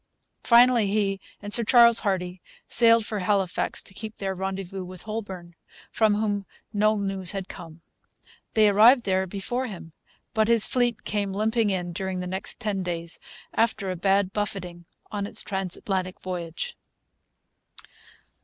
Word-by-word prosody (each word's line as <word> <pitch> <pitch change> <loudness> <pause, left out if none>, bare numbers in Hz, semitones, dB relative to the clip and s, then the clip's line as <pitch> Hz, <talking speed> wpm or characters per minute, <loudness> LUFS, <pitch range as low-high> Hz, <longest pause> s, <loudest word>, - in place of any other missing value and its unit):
Finally, 240 -2 +5
he 195 -1 0 0.2
and 205 0 -2
Sir 235 - +6
Charles 235 0 +6
Hardy 185 -3 -2 0.3
sailed 230 -2 +5
for 210 -1 -3
Halifax 190 -1 -1
to - - -11
keep 220 +2 -7
their 195 -1 -2
rendezvous 190 0 -5
with 180 -1 -10
Holbourne, 195 -6 -6 0.4
from 215 -2 +2
whom 205 -2 -1 0.3
no 215 +1 +2
news 195 -2 +1
had 195 -1 -4
come. 165 -2 -10 0.7
They 215 -1 +5
arrived 225 +5 +6
there 190 -1 0
before 240 +7 -3
him; 170 -6 -9 0.4
but 220 -1 +2
his 230 -2 +6
fleet 245 -3 0
came 200 -2 -2
limping 220 +2 +1
in 180 -3 -2
during 190 +1 -3
the 180 - -4
next 190 +1 -4
ten 205 -3 -2
days, 170 -2 -5 0.3
after 220 -4 0
a - - -3
bad 195 +2 +1
buffeting 180 -5 -4 0.2
on 200 -1 -3
its - - -3
transatlantic 190 -1 -3
voyage. 180 - -5
195 Hz, 145 wpm, -25 LUFS, 185-215 Hz, 0.7 s, Sir